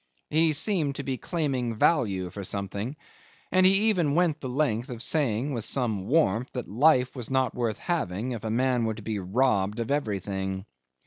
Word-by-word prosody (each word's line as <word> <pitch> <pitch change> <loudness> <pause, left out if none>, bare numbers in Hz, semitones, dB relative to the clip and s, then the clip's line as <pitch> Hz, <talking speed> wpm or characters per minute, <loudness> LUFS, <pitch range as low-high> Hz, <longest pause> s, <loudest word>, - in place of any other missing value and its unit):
He 160 0 +3
seemed 150 -3 +1
to 140 - -4
be 130 -2 -3
claiming 135 -9 -2
value 100 - +1
for 100 - -7
something, 100 +6 -4 0.6
and 185 0 +5
he 195 +3 +5
even 170 -9 +1
went 170 -3 +1
the 130 - -4
length 125 -4 0
of 120 -2 -4
saying 140 -2 0
with 115 -3 -2
some 110 -8 -1
warmth 125 -5 +2
that 125 -3 -4
life 125 +3 +3
was 125 -4 -5
not 130 -2 +1
worth 115 -3 -2
having 125 - -2
if 115 -3 -5
a 110 - -3
man 125 +1 +1
were 110 -1 -1
to 110 - -10
be 110 -1 -3
robbed 105 +1 +1
of 115 +3 -2
everything. 95 -7 -2
125 Hz, 185 wpm, -27 LUFS, 105-145 Hz, 0.6 s, and